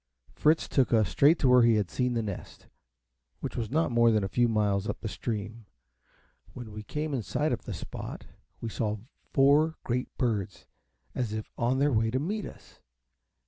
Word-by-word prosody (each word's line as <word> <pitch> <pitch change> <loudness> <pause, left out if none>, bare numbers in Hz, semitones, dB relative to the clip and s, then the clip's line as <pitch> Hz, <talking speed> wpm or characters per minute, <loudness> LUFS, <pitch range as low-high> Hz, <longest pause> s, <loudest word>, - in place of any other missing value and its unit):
Fritz 155 +2 +2
took 135 -3 +2
us 110 -5 +3
straight 150 +4 +5
to 135 - +2
where 125 0 +7
he 115 -1 +5
had 105 -4 0
seen 125 -1 0
the 115 - 0
nest, 100 -4 -7 0.7
which - - -5
was 115 -3 -2
not 155 +1 +1
more 120 0 +5
than 110 -3 +2
a - - 0
few 120 +4 +2
miles 105 -2 +1
up - - -3
the 115 - -4
stream. 110 0 -5 0.9
When 120 -4 -8
we 105 +1 -7
came 150 +6 -4
in 130 - 0
sight - - -1
of - - -5
the - - -4
spot, - - -7 0.4
we 115 - -3
saw 110 -1 -2 0.3
four 145 +4 +4
great 125 +1 -2
birds, 110 -7 -2 0.5
as 120 -4 -2
if 110 0 -5
on 120 +3 +1
their 140 +1 +2
way 110 0 +2
to 130 +3 0
meet 205 +8 -3
us. - - -15
120 Hz, 190 wpm, -28 LUFS, 110-135 Hz, 0.9 s, where